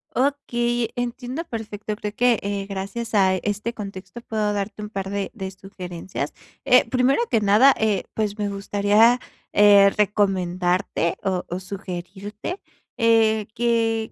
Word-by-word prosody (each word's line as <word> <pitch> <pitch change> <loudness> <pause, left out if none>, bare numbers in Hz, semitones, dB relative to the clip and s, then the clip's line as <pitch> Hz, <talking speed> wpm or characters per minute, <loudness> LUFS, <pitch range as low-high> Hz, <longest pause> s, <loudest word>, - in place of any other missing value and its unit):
Okey, 240 -4 0
entiendo 245 +4 -4
perfecto, 215 -6 -5
creo 210 -1 -5
que, 245 -1 +3
eh, 200 -1 -3
gracias 200 +4 -4
a 190 -2 +4
este 210 +4 -3
contexto 200 0 -8
puedo 215 -3 -1
darte 205 +1 -4
un 210 - -6
par 195 -2 -4
de 200 0 -3
de 195 -4 -5
sugerencias. 180 -4 -7 0.3
Eh, 250 - +6
primero 255 - +2
que 225 - +3
nada, 210 +7 +6
eh, 215 -3 +1
pues, 210 -1 -2
me 210 -1 -1
gustaría, 205 +4 +3 0.3
eh, 200 -1 +7
recomendarte 185 -4 0
o 185 -2 -1
o 180 - -3
sugerirte, 195 - -6 0.4
eh, 225 -2 +3
que, 225 -1 +1
210 Hz, 135 wpm, -23 LUFS, 195-230 Hz, 0.4 s, eh